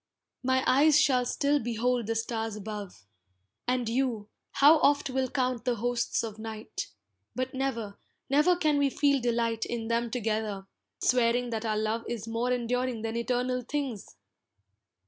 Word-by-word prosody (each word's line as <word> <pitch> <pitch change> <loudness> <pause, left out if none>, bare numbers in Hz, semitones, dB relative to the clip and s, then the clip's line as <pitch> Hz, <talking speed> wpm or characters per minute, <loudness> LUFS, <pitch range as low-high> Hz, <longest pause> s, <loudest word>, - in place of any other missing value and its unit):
My 260 0 +2
eyes 295 +3 +5
shall 255 -4 +3
still 285 +3 +1
behold 240 -1 -1
the 225 - -1
stars 225 -1 -2
above, 205 - -7 0.6
And 250 -1 0
you, 230 -3 -1 0.2
how 300 +3 +6
oft 285 -2 +3
will 260 0 0
count 255 -3 -1
the 245 -1 +1
hosts 240 +2 -1
of 220 -1 -6
night, 220 0 -6 0.5
But 255 0 -2
never, 235 -6 -3 0.3
never 300 +6 +4
can 305 -4 +2
we 280 -1 +3
feel 280 0 +2
delight 230 -1 0
In 230 -1 -4
them 235 0 0
together, 215 -4 -2 0.4
swearing 245 0 +2
that 225 0 -3
our 215 -1 0
love 220 +2 -1
Is 230 -2 -4
more 230 +2 -1
enduring 245 -1 -1
than 225 0 -3
eternal 250 +1 0
things! 260 -4 -4
240 Hz, 150 wpm, -29 LUFS, 225-260 Hz, 0.6 s, how